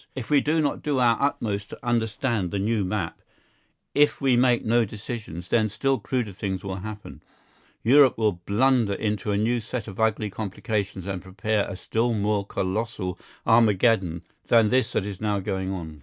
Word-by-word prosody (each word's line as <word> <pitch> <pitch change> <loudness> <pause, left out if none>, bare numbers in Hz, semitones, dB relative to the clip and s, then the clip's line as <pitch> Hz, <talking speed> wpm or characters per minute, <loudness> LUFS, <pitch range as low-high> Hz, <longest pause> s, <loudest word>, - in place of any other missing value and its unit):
If 130 +1 -6
we 145 -2 +5
do 155 +3 +1
not 145 - -1
do 145 -2 -1
our 120 -2 +4
utmost 105 -7 -1
to - - -11
understand 115 -3 0
the 100 - -3
new 105 +1 0
map, 90 - -3 0.7
if 145 0 +3
we 135 -3 +3
make 120 -1 +3
no 120 +2 +3
decisions, 105 -5 -7
then 110 -2 +2
still 135 +5 0
cruder 125 -5 -2
things 95 -1 -4
will 95 -1 -4
happen; 105 +2 -8 0.6
Europe 135 +2 +6
will 105 -6 0
blunder 115 0 +3
into 105 0 -2
a 100 - +1
new 115 +3 +1
set 115 0 -5
of 100 -1 -9
ugly 110 -2 +1
complications 100 -2 -3
and 95 -2 -4
prepare 105 +2 -1
a 95 - -5
still 115 +5 -1
more 105 -1 0
colossal 95 -1 -3 0.3
Armageddon 105 -6 +3 0.2
than 115 -2 +5
this 125 0 +2
that 95 - 0
is 100 -1 -6
now 105 -2 0
going 95 0 -3
on. 80 -5 -6
110 Hz, 175 wpm, -25 LUFS, 100-120 Hz, 0.7 s, Europe